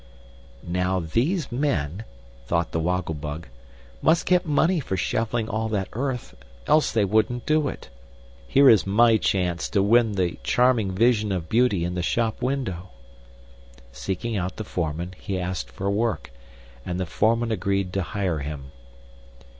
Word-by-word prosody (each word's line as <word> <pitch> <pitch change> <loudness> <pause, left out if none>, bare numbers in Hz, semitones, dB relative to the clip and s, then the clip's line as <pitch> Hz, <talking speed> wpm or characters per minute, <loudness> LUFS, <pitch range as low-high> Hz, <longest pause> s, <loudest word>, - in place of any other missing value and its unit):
"Now 90 +2 0
these 130 - -1
men," 110 - -1 0.4
thought 85 +3 0
the 85 - -1
Woggle 90 0 -1
Bug, 75 +2 -6 0.5
"must 165 +2 +3
get 180 -1 +2
money 160 +4 +2
for 95 -9 -3
shoveling 115 +4 -1
all 110 +1 -2
that 100 -3 -2
earth, 125 0 -3 0.3
else 155 - +3
they 110 -3 +2
wouldn't 110 +4 +1
do 155 -1 +2
it. - - -7 0.6
Here 140 - +5
is 110 -6 +6
my 115 +3 +5
chance 90 -4 0
to 100 -3 +2
win 115 +1 +4
the 90 -3 -1
charming 120 -5 +2
vision 110 0 +2
of 90 -3 -3
beauty 110 -7 +2
in 90 - -3
the 90 - -2
shop 115 +6 -1
window!" 120 -9 -2 1.0
Seeking 95 - -3
out 90 -2 -2
the 110 - -5
foreman, 85 -1 -3
he 95 - -3
asked 90 -8 -3
for 95 +8 -5
work, 110 +3 -1 0.5
and 90 +5 -4
the 95 - -1
foreman 115 +5 +1
agreed 100 -3 -1
to 95 - 0
hire 90 -1 -2
him. 70 -1 -6
100 Hz, 155 wpm, -24 LUFS, 90-120 Hz, 1.0 s, is